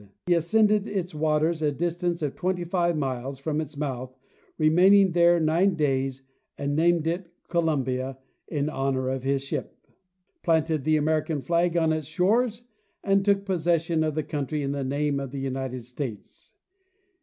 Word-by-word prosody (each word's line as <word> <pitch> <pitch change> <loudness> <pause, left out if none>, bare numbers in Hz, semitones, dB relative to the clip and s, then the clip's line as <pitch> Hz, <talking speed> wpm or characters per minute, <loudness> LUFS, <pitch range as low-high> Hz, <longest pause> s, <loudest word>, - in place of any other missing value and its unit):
He 180 - +3
ascended 210 +5 +3
its 180 -4 -3
waters 155 +1 +1
a 150 -1 +2
distance 170 +2 -2
of 145 - -1
twenty 185 -1 -2
five 175 -1 0
miles 135 -1 -3
from 150 +3 -2
its 155 -1 -8
mouth, 130 -3 -4 0.4
re 155 - +3
maining 190 +3 +5
there 175 0 +5
nine 170 +4 +2
days, 135 -3 -1 0.3
and 140 0 -2
named 165 0 +3
it 170 +1 -2
"' - - -44
Columbia 135 -6 0 0.2
" - - -48
in 145 -3 -1
honor 135 -3 -1
of 130 0 -2
his 135 +1 0
ship, 140 - -5 0.6
planted 160 -4 +1
the 155 0 +3
American 155 -1 0
flag 170 0 +1
on 160 -1 +3
its 155 -3 -3
shores 215 +8 +1 0.4
and 195 0 +3
took 200 0 +2
pos 185 -4 -2
session 165 -1 +1
of 155 -2 -1
the 155 - -1
country 150 0 -3
in 135 - -1
the 140 -1 -2
name 140 +1 0
of 135 -1 -5
the 140 - -7
United 130 -1 -3
States. 125 -4 -8
155 Hz, 175 wpm, -26 LUFS, 140-175 Hz, 0.6 s, maining